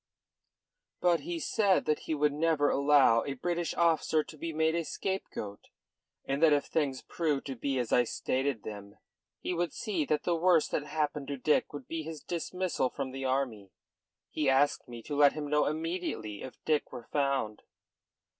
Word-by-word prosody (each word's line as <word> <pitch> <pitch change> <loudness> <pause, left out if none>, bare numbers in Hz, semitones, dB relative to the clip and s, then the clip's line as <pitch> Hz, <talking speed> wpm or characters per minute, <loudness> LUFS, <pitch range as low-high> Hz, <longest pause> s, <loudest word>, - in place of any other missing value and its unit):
"But 175 -2 +3
he 340 +2 -4
said 205 - +2
that 150 - +1
he 160 - -1
would 150 0 +2
never 150 -1 +2
allow 140 -5 +5
a 140 - -3
British 175 +5 -2
officer 160 -2 +2
to 155 - -12
be 165 +2 -4
made 160 0 +1
a 170 0 0
scapegoat, 155 - -4 0.6
and 135 +2 -1
that 160 -2 +6
if 145 - +2
things 140 -5 -1
proved 150 -5 -1
to 135 - -4
be 135 +2 -2
as 125 -2 -1
I 125 - +5
stated 130 0 -1
them 100 -1 -8 0.5
he - - -2
would 175 -2 -1
see 190 -8 -1
that 150 +1 0
the 175 - +1
worst 170 -1 +3
that 150 - -1
happened 150 -2 -2
to 140 - -3
Dick 150 +4 +2
would 145 -3 -8
be 165 -1 -3
his 160 -1 -7
dismissal 175 -4 -1
from 135 -1 -4
the 135 0 -5
army. 130 -7 -1 0.6
He 150 -3 +1
asked 135 +2 +2
me 120 -1 -9
to 145 - -4
let 145 0 +6
him 150 -1 -4
know 150 +1 +2
immediately 155 - -3
if 130 - -8
Dick 155 -2 +1
were 125 -3 -8
found." 135 -7 0
150 Hz, 185 wpm, -30 LUFS, 135-165 Hz, 0.6 s, that